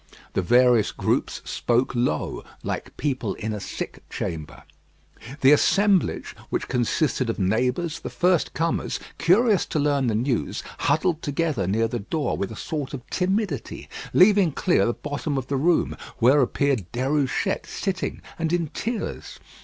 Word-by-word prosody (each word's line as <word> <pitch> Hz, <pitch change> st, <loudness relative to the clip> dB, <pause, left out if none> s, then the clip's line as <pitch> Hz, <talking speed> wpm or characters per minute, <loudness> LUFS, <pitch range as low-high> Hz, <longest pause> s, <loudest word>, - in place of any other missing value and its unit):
The -, -, +1 dB
various 120 Hz, +2 st, +4 dB
groups -, -, -1 dB
spoke 120 Hz, +2 st, 0 dB
low, 120 Hz, -11 st, -1 dB, 0.2 s
like -, -, -4 dB
people 130 Hz, -8 st, -1 dB
in 110 Hz, 0 st, -4 dB
a 105 Hz, -, -4 dB
sick -, -, -6 dB
chamber. 80 Hz, -3 st, -5 dB, 0.8 s
The 135 Hz, -, +7 dB
assemblage, 195 Hz, +5 st, +3 dB
which -, -, -2 dB
consisted 130 Hz, +1 st, 0 dB
of 115 Hz, -, -1 dB
neighbours, 125 Hz, -, 0 dB
the -, -, -6 dB
first 180 Hz, -2 st, +1 dB
comers, 165 Hz, +1 st, -1 dB, 0.2 s
curious 205 Hz, +3 st, +4 dB
to -, -, -2 dB
learn 145 Hz, -3 st, +2 dB
the 110 Hz, -, +1 dB
news, 120 Hz, +1 st, -1 dB, 0.2 s
huddled 165 Hz, 0 st, +1 dB
together 145 Hz, -, -1 dB
near 110 Hz, +4 st, +2 dB
the 120 Hz, +1 st, -3 dB
door 145 Hz, +9 st, -2 dB
with 100 Hz, -, -3 dB
a -, -, -7 dB
sort 145 Hz, 0 st, -4 dB
of 130 Hz, 0 st, -10 dB
timidity, 190 Hz, -, -1 dB, 0.2 s
leaving 190 Hz, -4 st, +5 dB
clear 180 Hz, -4 st, +2 dB
the 120 Hz, -, +1 dB
bottom 145 Hz, 0 st, -3 dB
of 130 Hz, -, -2 dB
the 140 Hz, -, 0 dB
room, 165 Hz, +5 st, +2 dB, 0.2 s
where 130 Hz, +4 st, +5 dB
appeared 130 Hz, -6 st, 0 dB
Déruchette 135 Hz, +8 st, 0 dB
sitting 190 Hz, -2 st, -3 dB, 0.2 s
and 165 Hz, -1 st, 0 dB
in 170 Hz, -3 st, 0 dB
tears. 230 Hz, +7 st, -4 dB
140 Hz, 150 wpm, -24 LUFS, 120-170 Hz, 0.8 s, The